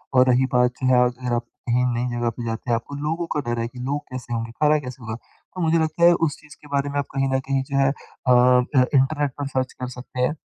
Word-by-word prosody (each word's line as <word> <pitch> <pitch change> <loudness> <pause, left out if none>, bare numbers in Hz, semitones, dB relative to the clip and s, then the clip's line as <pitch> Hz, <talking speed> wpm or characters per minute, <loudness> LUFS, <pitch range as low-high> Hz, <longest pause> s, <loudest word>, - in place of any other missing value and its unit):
और 130 0 +6
रही 125 +1 +4
बात 125 0 +4
जो 130 - +1
है 125 -1 +5
अगर 125 0 -2
आप 120 0 -1 0.2
कहीं 125 +1 +3
नई 120 +1 -1
जगह 120 0 +1
पे 115 +1 -7
जाते 115 +2 -4
हैं 115 - +4
आपको 120 +5 -5
लोगों 165 +3 -1
का - - +1
डर 120 - -1
है 115 - -1
कि 125 +1 -12
लोग 140 +3 -2
कैसे 125 -2 -6
होंगे? 115 0 -3
खाना 150 +5 +3
कैसे 125 -2 -9
होगा? 110 -1 -4
तो 180 +9 -12
मुझे 165 0 +3
लगता 160 +1 0
है 175 0 +8
उस 145 - -5
चीज़ 155 +1 -15
के 150 - -14
बारे 140 0 -1
में 145 - -3
आप 140 - -1
कहीं 135 0 +1
न 130 - +2
कहीं 135 -1 +2
जो 135 +1 -3
है 135 0 +4
अ 135 -2 -4
अ, 125 +1 +5
इंटरनेट 140 +1 +2
पर 145 - -2
सर्च 130 -1 -2
कर 125 - -6
सकते 125 0 -6
हैं। 145 +5 +1
130 Hz, 275 wpm, -23 LUFS, 125-145 Hz, 0.2 s, है